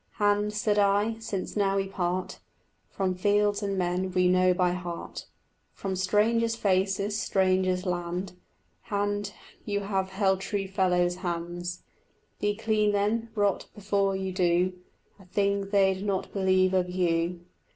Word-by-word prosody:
Hand, 205 0 +1
said 210 0 +1
I, 205 +3 +2
since 215 -4 -4
now 195 -2 +2
we 195 0 0
part 185 -1 -2 0.5
From 190 -1 -1
fields 205 +2 +2
and 200 -1 -2
men 180 +1 -1
we 180 0 +3
know 185 0 +4
by 180 0 +2
heart, 175 -1 -6 0.5
From 195 -1 -3
strangers' 220 +5 +2
faces, 200 0 0
strangers' 185 -1 +1
lands, 180 +1 -3 0.6
Hand, 205 -1 -1 0.3
you 205 -1 -2
have 195 -1 -1
held 190 -1 +1
true 195 -1 -2
fellows' 180 -2 +1
hands. 175 0 -4 0.6
Be 205 0 0
clean 215 -1 +1
then; 215 +3 0
rot 205 -2 +1
before 200 -1 0
you 190 0 -3
do 180 0 +2 0.5
A 195 - -16
thing 200 +1 0
they'd 195 -1 +2
not 195 -2 -2
believe 185 -1 +3
of 180 -1 +1
you. 175 -1 0
195 Hz, 140 wpm, -27 LUFS, 185-205 Hz, 0.6 s, know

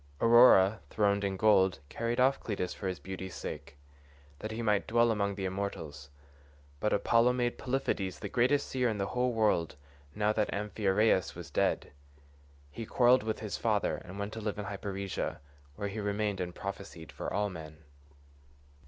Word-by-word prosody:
Aurora, 115 -4 +6
throned 100 -1 +1
in 95 -1 -1
gold, 95 -3 +4
carried 115 - -2
off 130 +2 +4
Cleitus 100 -4 -3
for 100 - -5
his 90 -1 -2
beauty's 95 -1 -7
sake, 70 -1 -7 0.6
that 110 - -5
he 110 +1 -4
might 105 -2 +1
dwell 120 +1 +3
among 100 -2 0
the 95 -1 -4
immortals, 80 -7 -5 0.7
but 105 - 0
Apollo 115 +2 +3
made 120 -1 -1
Polypheides 105 - -1
the - - -5
greatest 130 +4 +2
seer 125 -2 0
in 110 - -2
the 100 - -1
whole 125 +4 0
world 105 -8 +1 0.4
now 105 0 +2
that 105 -1 0
Amphiaraus 105 -2 +1
was - - -9
dead. - - 0 0.8
He 115 - -6
quarrelled 125 +3 +4
with 110 0 -3
his 105 -5 -4
father - - 0
and 95 +2 -10
went 100 +1 -4
to 110 - -6
live 105 -1 -3
in 105 - -4
Hyperesia, 100 -1 -4 0.4
where 100 - -3
he 100 +2 -5
remained 105 -1 -1
and 90 -1 -4
prophesied 100 -4 -7
for - - -5
all 105 +1 0
men. 80 -2 -10
105 Hz, 170 wpm, -31 LUFS, 95-115 Hz, 0.8 s, Aurora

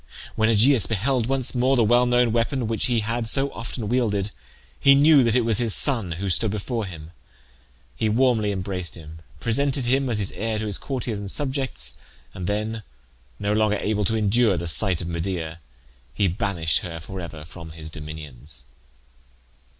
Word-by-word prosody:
When 110 0 +2
Aegeus 115 +2 +4
beheld 115 +3 0
once 135 -1 0
more 130 +2 +2
the 120 - +3
well 120 +3 +4
known 120 -1 +3
weapon 120 +2 0
which 110 0 0
he 120 -3 +1
had 115 +2 -2
so 135 +4 +2
often 115 -1 -5
wielded, 105 -4 0 0.5
he 140 0 +6
knew 145 -1 +6
that 115 -1 +2
it 125 - +4
was 115 -3 +3
his 115 -4 +5
son 115 - +2
who 95 +4 -4
stood 105 +4 +1
before 110 +2 -3
him. 80 -3 -10 0.8
He 110 - 0
warmly 115 -2 +2
embraced 95 -2 -4
him, 80 -1 -11 0.2
presented 135 +2 +1
him 135 +2 +1
as 115 - 0
his 100 -2 -1
heir 110 0 -3
to 110 - -3
his 105 -2 +1
courtiers 120 -6 -4
and 100 -1 -5
subjects, 130 - -3 0.3
and 90 -2 -5
then, 110 +2 -2 0.6
no 100 +6 -1
longer 105 -1 +2
able 105 0 -1
to 110 - 0
endure 105 -1 +2
the 85 - -3
sight 85 +4 +4
of 85 - -5
Medea, 85 -1 -4 0.6
he 100 - +2
banished 85 -3 0
her 85 -2 -7
for 95 +3 -7
ever 80 -3 -8
from 85 0 -10
his 80 -1 -8
dominions. 75 -4 -5
110 Hz, 180 wpm, -23 LUFS, 90-120 Hz, 0.8 s, he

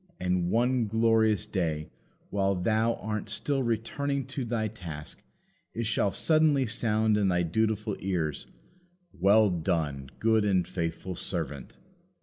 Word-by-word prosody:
And, 90 -1 0
one 120 +2 +2
glorious 110 -1 +3
day, 80 -7 -2 0.4
while 100 -1 +1
thou 110 +5 +1
art 105 -1 -4
still 135 +6 -1
returning 130 +4 -1
to 135 - -2
thy 115 -2 -1
task, 85 -9 -8 0.5
it 115 +1 -2
shall 110 -2 +1
suddenly 155 -2 +3
sound 110 -2 +1
in 100 -2 +2
thy 90 -1 +2
dutiful 110 +4 0
ears: 85 -6 -2 0.7
"Well 100 +3 +4
done! 80 -6 -1
good 110 -1 +3
and 95 -4 +2
faithful 90 0 -3
servant!" 70 -5 -4
105 Hz, 130 wpm, -28 LUFS, 90-115 Hz, 0.7 s, Well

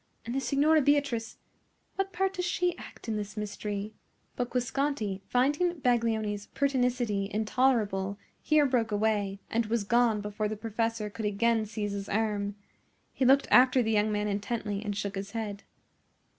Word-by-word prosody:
And 235 - -4
the 270 - 0
Signora 300 +3 +3
Beatrice,—what 285 +7 -2
part 385 +1 0
does 360 -2 -2
she 355 0 0
act - - -12
in 220 -1 -1
this 210 +1 -6
mystery?" 210 0 -4 0.4
But 245 -1 -2
Guasconti, 250 -5 -1
finding 295 +8 +2
Baglioni's 220 -5 0
pertinacity 250 -7 0
intolerable, 210 -3 +1 0.2
here 305 -1 +4
broke 240 -5 +1
away, 205 -2 0
and 230 -1 +1
was 225 -1 0
gone 235 0 +3
before 210 +1 -2
the 215 0 -4
professor 225 -1 -2
could 220 +1 -5
again 220 +2 +1
seize 210 -1 -3
his 200 0 -5
arm. 205 -1 -1 0.6
He 265 - 0
looked 270 +2 +5
after 255 0 +6
the 225 - 0
young 215 0 +2
man 210 0 0
intently 205 0 -2
and 205 -2 -3
shook 200 -1 -3
his 195 +1 -6
head. 210 -3 -4
225 Hz, 155 wpm, -29 LUFS, 205-255 Hz, 0.6 s, after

